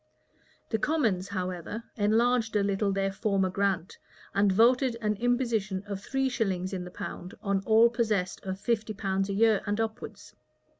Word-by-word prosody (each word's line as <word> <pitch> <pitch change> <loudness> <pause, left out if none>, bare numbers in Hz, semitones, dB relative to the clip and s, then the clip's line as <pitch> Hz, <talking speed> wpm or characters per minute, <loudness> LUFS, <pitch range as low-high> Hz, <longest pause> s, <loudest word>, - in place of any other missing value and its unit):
The 220 - +1
commons, 220 - +1
however, 185 +2 -4
enlarged 225 +2 +2
a 205 - +3
little 200 0 0
their 195 0 0
former 195 -2 0
grant, 195 -2 -1 0.3
and 200 0 +3
voted 240 +4 +4
an 210 -2 0
imposition 230 -5 0
of 200 -1 -5
three 270 +5 -1
shillings 195 -7 -1
in 185 -1 -3
the - - -7
pound 180 0 -7
on 200 -2 +1
all 225 +1 +7
possessed 220 -6 -1
of 190 0 -4
fifty 220 -1 -1
pounds 195 0 -1
a - - -1
year 220 0 +3
and 205 +1 -1
upwards. 220 -1 -5
205 Hz, 160 wpm, -28 LUFS, 195-230 Hz, 0.3 s, all